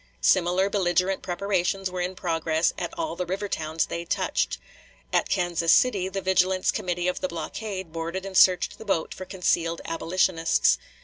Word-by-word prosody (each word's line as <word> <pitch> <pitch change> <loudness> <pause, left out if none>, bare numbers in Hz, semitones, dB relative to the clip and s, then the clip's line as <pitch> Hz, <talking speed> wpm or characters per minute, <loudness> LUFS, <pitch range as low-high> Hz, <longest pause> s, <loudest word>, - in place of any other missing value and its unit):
Similar 185 +1 +3
belligerent 190 -1 +1
preparations 190 0 -1
were 180 -1 -3
in 180 +1 -3
progress 165 -2 0
at - - -4
all 325 - -2
the 180 0 -3
river 195 +3 -2
towns 160 -3 -1
they 170 - -4
touched. 165 - -1 0.6
At - - +2
Kansas 175 -3 +1
City 200 -6 +3
the 195 0 -4
vigilance 185 0 +2
committee 175 0 -2
of 180 - -1
the - - 0
blockade 185 +2 -5
boarded 170 +3 -4
and 195 -1 -7
searched 180 -1 +4
the 220 - -9
boat 190 -6 -1
for 185 - -8
concealed 170 -3 0
"abolitionists." 165 - +2
180 Hz, 165 wpm, -26 LUFS, 170-190 Hz, 0.6 s, searched